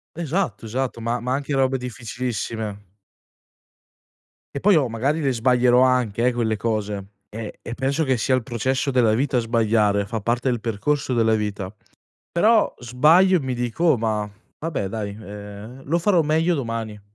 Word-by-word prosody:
Esatto, 170 -4 -2
esatto, 125 +1 -3
ma 115 +2 -1
ma 125 +1 -2
anche 140 +1 -2
robe 135 0 +2
difficilissime 110 -4 -5 1.7
e - - -2
poi 200 +5 +4
oh, 135 -6 +2
magari 140 +8 0
le 135 -2 +1
sbaglierò 125 +1 +4
anche, 125 -3 +2
eh, 125 - +2
quelle 110 -3 0
cose. 105 -3 -2 0.2
E 110 0 -7
e 115 - -6
penso 135 +5 0
che 130 -2 +1
sia 130 +3 +2
il 130 - -1
processo 130 +4 -1
della 120 -4 +3
vita 130 +2 +1
sbagliare, 110 -3 +2
fa 110 +2 -4
parte 120 +4 0
del 120 -3 -1
percorso 130 +5 -1
della 115 -2 +3
vita. 105 -2 -3 0.6
Però 215 +5 +3
sbaglio 155 +10 +4
e - - -4
mi 130 -2 -3
dico: 120 +7 -2
"Oh, 160 -5 +5
ma 110 -2 -1 0.3
vabbè 150 -11 -3
dai, 100 0 -4
ehm, 105 +4 -9
lo 165 +5 +1
farò 175 -1 +3
meglio 160 +3 +2
domani." 115 -6 -4
120 Hz, 165 wpm, -23 LUFS, 110-135 Hz, 1.7 s, Oh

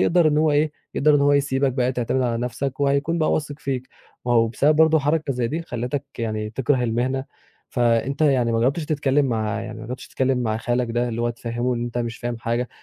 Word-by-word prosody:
يقدر 170 -2 +4
إن 150 0 +2
هو 155 0 +3
إيه، 150 +1 +2 0.2
يقدر 150 +1 +4
إن 145 - +4
هو 145 0 +4
يسيبَك 140 -1 +2
بقى 125 0 0
تعتمد 125 +1 0
على 120 -2 0
نفسَك، 130 +3 -3
وهيكون 140 +4 +1
بقى 155 - +2
واثق 145 -1 -2
فيك، 130 -3 -3 0.4
ما 120 - +2
هو 115 -1 +4
بسبب 145 +6 +2
برضه 160 0 +5
حركة 145 0 0
زي 125 -2 -1
دي، 160 +6 -3
خلّتك 125 0 -3
يعني 110 -2 -2
تِكره 130 +2 +1
المهنة، 125 +3 0 0.4
فأنت 120 +3 +1
يعني 130 -6 +3
ما 115 - +1
جرّبتِش 140 +6 +1
تتكلِّم 145 -2 +1
مع 110 -2 -1
يعني 110 -1 -7
ما 110 - -8
جرّبتِش 125 +2 -7
تتكلِّم 130 -1 0
مع 110 -3 0
خالَك 120 +1 -1
ده، 120 +1 0
اللّي 115 0 -3
هو 120 - +1
تفهّمه 120 +1 -2
إن 120 0 -2
أنت 120 0 -4
مش 120 0 -3
فاهم 120 -1 -4
حاجة 120 +1 -1
125 Hz, 225 wpm, -23 LUFS, 120-145 Hz, 0.4 s, برضه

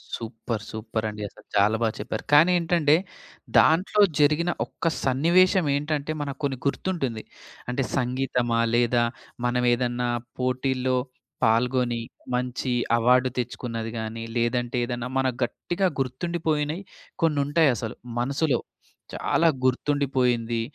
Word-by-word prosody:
Super! 115 -1 -5
సూపరండి! 110 -1 -4
అసలు - - -19
చాలా 105 +2 +4
బా 115 - +3
చెప్పారు. - - -4
కానీ 165 +5 +7
ఏంటంటే 165 -3 +3 0.6
దాంట్లో 185 +6 +4 0.2
జరిగిన 155 +4 +3
ఒక్క - - -4 0.2
సన్నివేశం 170 +7 +4
ఏంటంటే, 150 +1 -2
మనకు 140 0 -5
కొన్ని 135 -2 0
గుర్తుంటుంది. 135 -9 -2 0.5
అంటే 130 +2 0
సంగీతమా 125 -2 0 0.2
లేదా 120 0 +3 0.4
మనం 125 0 +1
ఏదన్నా 120 0 -1 0.3
పోటీల్లో 130 0 0 0.5
పాల్గొని, 120 +1 +2 0.3
మంచి 125 0 -2 0.3
అవార్డ్ 125 +2 +4
తెచ్చుకున్నది 115 -2 -4
గానీ, 110 +1 -5
లేదంటే 120 +1 0
ఏదన్నా 120 0 -4
మనకు 130 -2 0
గట్టిగా 175 +10 -2
గుర్తుండిపోయినయి 155 +4 -1 0.4
కొన్నుంటాయసలు. 145 -6 +2 0.2
మనసులో 140 +1 +1 0.5
చాలా 165 - +2 0.2
గుర్తుండిపోయింది. 125 -4 +1
125 Hz, 105 wpm, -25 LUFS, 120-150 Hz, 0.6 s, కానీ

